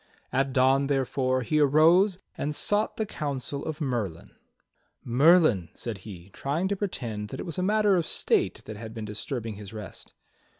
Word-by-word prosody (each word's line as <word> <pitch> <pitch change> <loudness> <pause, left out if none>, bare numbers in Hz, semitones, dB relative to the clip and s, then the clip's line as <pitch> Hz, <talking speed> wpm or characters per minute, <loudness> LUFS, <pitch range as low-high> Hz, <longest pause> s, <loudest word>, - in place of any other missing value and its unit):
At 135 +1 +1
dawn, 135 +2 +3
therefore, 130 -1 0
he 150 +7 +1
arose 165 +7 +5 0.2
and 150 +1 -3
sought 205 +6 0
the 220 - 0
counsel 140 -5 -4
of 155 0 -5
Merlin. 115 - -3 0.7
"Merlin," 135 - +4
said 115 -5 -5
he, 95 -2 -11
trying 155 +7 -1
to 200 - 0
pretend 120 - -4
that - - -7
it - - -4
was 170 0 -4
a - - +1
matter 210 +1 +3
of 170 - -1
state - - +1
that 110 -1 -7
had 110 +1 -8
been 110 -1 -5
disturbing 110 +1 -4
his 105 +1 -9
rest. 105 -3 -9
135 Hz, 170 wpm, -27 LUFS, 110-160 Hz, 0.7 s, arose